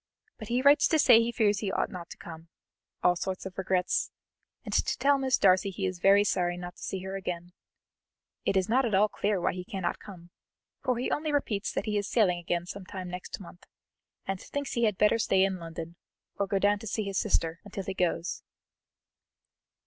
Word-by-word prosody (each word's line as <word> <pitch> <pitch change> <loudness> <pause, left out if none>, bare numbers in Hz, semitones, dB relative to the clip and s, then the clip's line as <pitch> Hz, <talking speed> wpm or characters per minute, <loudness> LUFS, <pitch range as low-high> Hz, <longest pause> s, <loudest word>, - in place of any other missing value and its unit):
But 215 - -7
he 245 +3 0
writes 285 +1 +6
to 320 - +3
say 230 -6 +7
he 230 +1 0
fears 210 -3 +2
he 200 -2 -2
ought - - -1
not 175 -2 -8
to - - -10
come 165 0 -10 0.6
all 180 0 +5
sorts 185 +2 -4
of 190 -1 -7
regrets, 185 -1 0 0.6
and - - -5
to - - +1
tell 280 0 +3
Miss 265 -1 +2
Darcy 185 +1 +4
he 195 0 -3
is 185 -1 -3
very 200 +3 +6
sorry 175 -3 0
not 180 0 -8
to - - -15
see 190 -1 -4
her 190 0 -5
again. 175 -2 -5 0.9
It 195 - +1
is 185 - +1
not 255 +4 +3
at 225 -5 +1
all 205 +2 +5
clear 205 -1 0
why 175 - 0
he 180 +1 -5
cannot 190 -2 -3
come, 175 -4 -12 0.5
for 250 -2 +1
he 250 - -2
only 305 0 -1
repeats 225 -9 -1
that - - -2
he 210 -2 0
is 205 - -4
sailing 185 -7 +3
again 175 0 -2
some 195 +2 -7
time 185 -2 -6
next 180 0 -6
month, 175 -1 -13 0.6
and 195 -1 -3
thinks 285 -1 -4
he 235 -1 +2
had 210 -4 +1
better 210 +2 +4
stay 190 -3 +3
in 190 -1 0
London, 165 0 -7 0.4
or 200 - -1
go 195 - 0
down 205 +1 +2
to 225 - -8
see 215 +2 -1
his 195 -1 -1
sister, 165 -5 0
until 200 -1 -6
he 195 - -4
goes." 175 -2 -1
195 Hz, 215 wpm, -29 LUFS, 180-215 Hz, 0.9 s, say